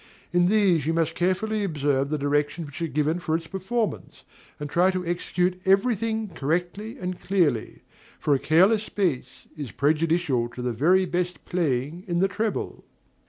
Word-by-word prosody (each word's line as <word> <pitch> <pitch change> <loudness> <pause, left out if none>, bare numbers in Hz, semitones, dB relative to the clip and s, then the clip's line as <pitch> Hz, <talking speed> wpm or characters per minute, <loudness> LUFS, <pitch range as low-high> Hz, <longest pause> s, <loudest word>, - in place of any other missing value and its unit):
In 175 0 +4
these 185 -7 +3
you 165 - +2
must 165 -1 +1
carefully 195 +5 0
observe 145 -6 0
the 155 - 0
directions 145 +3 0
which 145 +3 -9
are 165 - 0
given 155 +3 0
for 160 -2 -1
its 165 - -9
performance, 200 +6 -3 0.4
and 150 - -4
try 175 +5 +3
to 185 -1 -2
execute 180 +1 -1
every 195 +6 +4
thing 220 0 -2
correctly 175 - -2
and 180 -6 -4
clearly; 165 - 0 0.4
for 145 - +2
a 135 - +2
careless 195 +9 +3
bass 175 -11 -2
is 145 -5 -6
prejudicial 150 -4 +1
to 125 - -5
the 125 -1 -1
very 180 - +3
best 180 0 -3
playing 160 -1 -1
in 175 -1 -1
the 190 +3 +3
treble. 215 +2 -3
175 Hz, 165 wpm, -25 LUFS, 150-190 Hz, 0.4 s, In